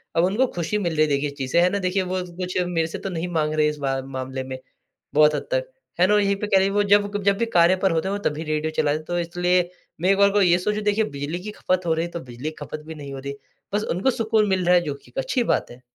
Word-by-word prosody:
अब 165 - +4
उनको 215 +8 +2
खुशी 175 +4 -1
मिल 175 -5 -1
रही 155 - +2
है - - -2
देखिए 140 +1 0
इस 140 - -11
चीज़ 130 -2 -4
से। 170 - +4
है 180 - +4
ना? 200 - -1
देखिए 190 0 0
वो 185 0 -2 0.2
कुछ, 180 0 -3
मेरे 165 -2 0
से 165 - -6
तो 195 - -4
नहीं 175 -1 -3
माँग 155 -1 +1
रहे 155 -1 +3
इस 150 - -5
बा 135 -2 -1
मामले 130 0 -5
में, 130 0 -6 0.6
बहुत 150 0 +5
हद - - -4
तक। - - -1 0.3
है 180 - +5
ना? 210 - +3
और 210 - +5
यहीं 200 0 +2
पे 205 +1 -4
कह 195 - +4
ली, 190 +1 +2
वो 205 +1 +2
जब 205 0 +3
कब 205 - -2
जब 200 0 +3
भी 235 - +1
कार्य 170 +2 +6
पर 190 0 +1
होते 165 +2 0
हैं, 195 - -1
वो - - -10
तब 150 - -7
ही 160 - -4
रेडियो 155 0 -1
चलाते 145 +1 +2
हैं, 155 - -9
तो 175 +1 -1
इसलिए 175 +1 +1 0.3
मैं 185 - +2
एक 195 - +3
बार 200 0 +6
को 205 0 +3
ये 175 -2 +5
सोचूँ 210 +3 -1
देखिए, 210 +1 +2
बिजली 145 0 -4
की 210 - -5
खपत 185 -3 -1
हो 165 - +2
रही 165 +1 0
है, 170 - -8
तो 170 - -4
बिजली 125 +1 -6
की 155 - -12
खपत 155 - -6
भी 160 - -7
नहीं 140 -2 -8
हो 135 - -6
रही। 140 +1 -5 0.4
बस 210 +1 +1
उनको 200 +9 +2
सुकून 220 -2 +1
मिल 185 -2 +1
रहा 180 +1 +5
है, 175 - +5
जो 150 -4 -3
कि 140 - -16
एक - - -17
अच्छी 235 - 0
बात - - 0
है। 120 +1 -13
175 Hz, 320 wpm, -23 LUFS, 150-200 Hz, 0.6 s, कार्य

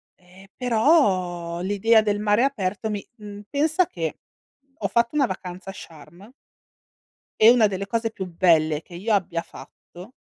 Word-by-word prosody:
ehm, 180 +2 -19
però 190 - +1
l'idea 205 +4 +3
del 205 -1 -1
mare 210 +2 +2
aperto 215 -5 -2
mi 205 -1 -4
mhmm, 205 -1 -10
pensa 315 +5 +1
che 365 - -5 0.6
ho - - -2
fatto 235 +4 0
una 285 -2 +3
vacanza 185 0 -7
a 195 - -6
Sharm 170 - -14 1.1
e 220 +2 +8
una 235 -3 +4
delle 195 0 -4
cose 225 +2 -2
più 195 -3 -6
belle 165 -3 +2
che 170 - -14
io 210 +5 -1
abbia 170 -4 -1
fatto 185 +8 -14
205 Hz, 150 wpm, -23 LUFS, 180-230 Hz, 1.1 s, e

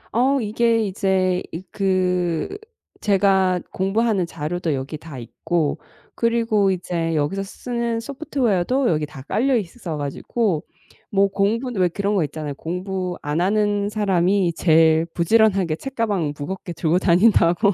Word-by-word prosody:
어 265 +4 +3
이게 225 0 +1
이제 190 -2 0
이 165 +3 -6
그 180 -4 0 0.5
제가 190 -2 +3
공부하는 195 0 +1
자료도 165 +1 -3
여기 135 +3 -5
다 150 -3 -10
있고 150 +6 -2 0.4
그리고 230 -4 +2
이제 170 -3 -2
여기서 155 +6 0
쓰는 235 +3 -3
소프트웨어도 255 - 0
여기 155 -2 0
다 135 -2 -11
깔려 250 - +1
있어 180 -5 -5
가지고 155 +5 -1 0.5
뭐 200 0 +3
공부는 210 +3 0
왜 180 - +4
그런 200 +4 -2
거 195 -5 +2
있잖아요. 150 -1 -5
공부 180 +3 -4
안 150 +3 -1
하는 205 +1 +1
사람이 195 -3 +1
제일 160 -1 +4
부지런하게 190 -3 +3
책가방 210 - -2
무겁게 175 +3 -5
들고 170 +1 +1
다닌다고. 185 +1 +4
190 Hz, 290 characters per minute, -22 LUFS, 170-215 Hz, 0.5 s, 왜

